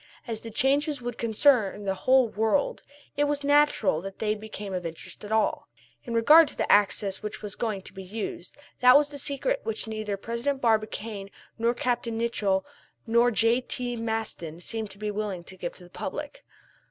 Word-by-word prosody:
As 225 -3 -4
the 230 - -7
changes 285 +5 +1
would 245 -1 -6
concern 220 -3 +3
the 195 - +1
whole 255 +5 +4
world 220 +6 0 0.3
it 290 0 +2
was 290 0 -1
natural 285 - +3
that 195 +1 -8
they 215 -1 0
became 210 -2 -7
of 180 -1 -2
interest 165 -1 -8
to 210 - -8
all. 220 0 +1 0.4
In 235 - -3
regard 300 +8 +7
to - - -9
the - - +1
new - - -3
axis 200 -1 +2
which 210 0 -6
was 205 -1 -4
going 210 -5 -3
to - - -12
be 190 - -8
used 190 -1 -6 0.2
that 250 +1 +7
was 295 0 +2
the 285 -1 -7
secret 310 - 0
which 450 - -3
neither 215 -2 -3
President 235 +7 -2
Barbicane 215 -3 -1 0.3
nor 235 +1 +2
Capt. 245 -1 -1
Nicholl 225 -4 0 0.4
nor 235 +1 +4
J.T. 245 +2 0
Maston 220 -8 -3
seemed 220 +3 -4
to 195 - -14
be 210 0 -3
willing 205 -4 -3
to 190 - -12
give 175 -2 -5
to - - -14
the 175 - -14
public. - - -6
225 Hz, 190 wpm, -27 LUFS, 205-250 Hz, 0.4 s, regard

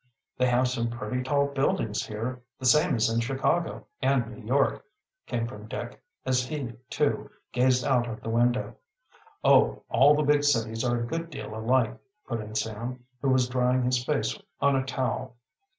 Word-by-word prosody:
"They 125 - +2
have 125 +1 +3
some 120 -2 -1
pretty 120 +1 -3
tall 140 +2 +2
buildings 135 -6 0
here, 115 +4 -4 0.2
the 130 - -7
same 150 +6 +5
as 115 - +2
in 115 0 +1
Chicago 135 +7 0 0.2
and 135 -2 +2
New 125 - -12
York," 135 +5 +1 0.4
came 115 -1 -1
from 105 -2 -8
Dick, - - -6 0.2
as 130 -1 +2
he, 130 -3 -4 0.2
too, - - 0 0.2
gazed 125 0 +3
out 125 -3 +2
of 110 - -6
the - - -5
window. 120 +2 +1 0.7
"Oh, - - +4
all 145 +3 +6
the 150 - +1
big 145 0 +3
cities 115 -5 +1
are 120 -1 +1
a 120 - -2
good 165 +6 -4
deal 140 -8 -7
alike," 115 +1 +1 0.3
put 115 -3 -2
in 105 0 -8
Sam, 115 +4 -3 0.2
who 135 - +1
was 130 -1 +3
drying 125 0 +1
his 125 0 +1
face 150 +2 0 0.2
on 140 0 +3
a 130 - +1
towel. 130 -1 -2
125 Hz, 180 wpm, -27 LUFS, 115-135 Hz, 0.7 s, all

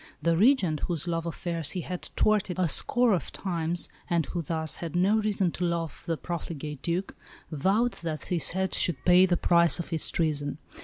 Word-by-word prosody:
The 170 0 +1
Regent, 190 - +3
whose 170 -2 -1
love 165 -1 -2
affairs 170 -2 -2
he 185 - -3
had 180 +2 -5 0.2
thwarted 210 -4 +1
a 185 -2 +2
score 240 - +3
of 180 - -2
times, 170 -2 -2 0.2
and 170 -3 +1
who 175 +4 -4
thus 160 0 -2
had 170 -2 -6
no 195 +5 +3
reason 200 -4 0
to 180 - -5
love 170 -2 -3
the 165 -1 -1
profligate 155 -4 -6
Duc, 175 +3 -2 0.4
vowed 195 - +1
that 155 -4 -4
his 175 -3 +1
head 190 +1 -1
should 175 - +2
pay 180 +1 +6
the 175 -1 +1
price 170 -1 +4
of 175 - -6
his 165 -2 +2
treason. 145 -3 -1
170 Hz, 190 wpm, -27 LUFS, 165-185 Hz, 0.4 s, pay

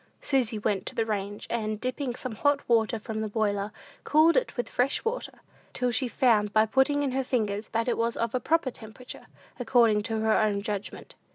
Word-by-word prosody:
Susy 250 -6 0
went 205 -2 -1
to - - -5
the 225 - +1
range, 205 -1 -3
and, 215 -2 -2
dipping 255 +1 -3
some 255 - -4
hot 285 +5 +1
water 230 -1 +2
from 220 0 -5
the 220 - -2
boiler, 205 -1 -1 0.3
cooled 315 +2 +4
it - - 0
with 245 - -2
fresh 260 - 0
water, 465 +2 -4 0.3
till 250 -1 0
she 250 +2 0
found, 225 -4 +2
by 215 +1 +4
putting 270 +5 +2
in 275 - 0
her 265 +1 0
fingers, 215 -4 -1
that 230 +1 -1
it 240 - 0
was 230 0 0
of 230 -1 -1
a 255 - +1
proper 320 0 +1
temperature, 230 +3 -11 0.3
according 230 -4 +3
to 220 0 -3
her 220 0 +3
own 205 -2 +1
judgment. 205 -2 -5
230 Hz, 200 wpm, -27 LUFS, 215-255 Hz, 0.3 s, cooled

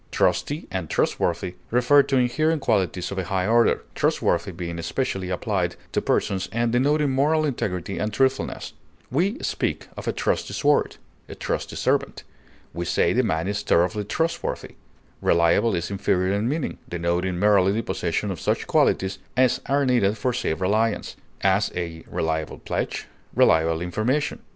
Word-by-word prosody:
Trusty 150 +3 0
and 90 -5 -3
trustworthy 85 +1 0 0.2
refer 125 +4 +5
to 135 -1 0
inherent 155 +5 +1
qualities 95 -5 0
of 95 - -3
a 95 - -2
high 95 +1 -1
order, 115 +2 +3
trustworthy 85 +3 +1
being 85 -1 -5
especially 95 +1 -2
applied 90 - -1 0.2
to - - 0
persons, 95 -1 0
and 115 +2 0
denoting 145 +4 +2
moral 150 +4 +2
integrity 95 - -3
and 105 +1 -1
truthfulness; 135 +4 0 0.4
we 185 - +1
speak - - -2
of - - -8
a - - +2
trusty - - -1
sword, 145 0 +2 0.3
a - - -7
trusty - - -3
servant; - - 0 0.5
we 85 - -3
say - - +2
the - - +3
man 80 +2 -1
is 100 0 -1
thoroughly 90 +5 +2
trustworthy. 165 +11 -2 0.5
Reliable 85 +7 +3
is 85 +3 -3
inferior 95 -1 +1
in 105 +4 0
meaning, 155 +2 -2
denoting 90 +1 -1
merely 100 -1 +4
the 110 +3 -1
possession 90 +4 -2
of 90 - -5
such - - 0
qualities 95 0 +1 0.2
as 130 -1 +3
are 140 0 +2
needed 110 -5 +2
for 125 +4 0
safe 80 -9 -1
reliance; 110 +3 0 0.3
as, 95 +2 +2
a 85 -2 -4
reliable 80 -1 -2
pledge; - - -3 0.3
reliable 80 0 +4
information. 115 - -1
100 Hz, 155 wpm, -24 LUFS, 90-130 Hz, 0.5 s, refer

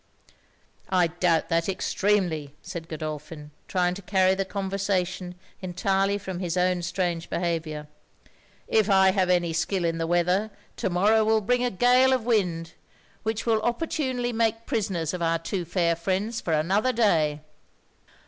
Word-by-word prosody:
'I 180 -2 +3
doubt 170 -3 +2
that 165 +1 +1
extremely,' 180 -7 0
said 165 -1 -7
Godolphin, 155 -1 -6 0.2
trying 180 -1 +1
to 195 - -8
carry 190 0 +3
the 195 0 -1
conversation 190 -2 -2 0.3
entirely 195 +2 0
from 190 -3 -6
his 180 -1 -2
own 180 0 +2
strange 175 -1 -2
behaviour. 160 -3 -2 0.8
'If 215 -1 +2
I 190 -1 +5
have 185 -1 +1
any 175 -2 +2
skill 175 +2 0
in 165 0 -1
the 165 - -1
weather, 180 +5 +1 0.3
to - - -1
morrow 210 +5 +3
will 220 0 +3
bring 245 +4 +1
a 250 - +2
gale 250 +5 +4
of 250 -4 0
wind, 175 -8 0 0.5
which 220 0 -2
will 225 -2 +2
opportunely 250 -1 -1
make 225 0 0
prisoners 190 - -1
of 180 - -4
our 165 0 +2
two 175 +2 -4
fair 170 -1 +1
friends 195 +7 -2
for 170 - -3
another 190 +11 +2
day.' 160 -10 +2
185 Hz, 150 wpm, -26 LUFS, 170-210 Hz, 0.8 s, I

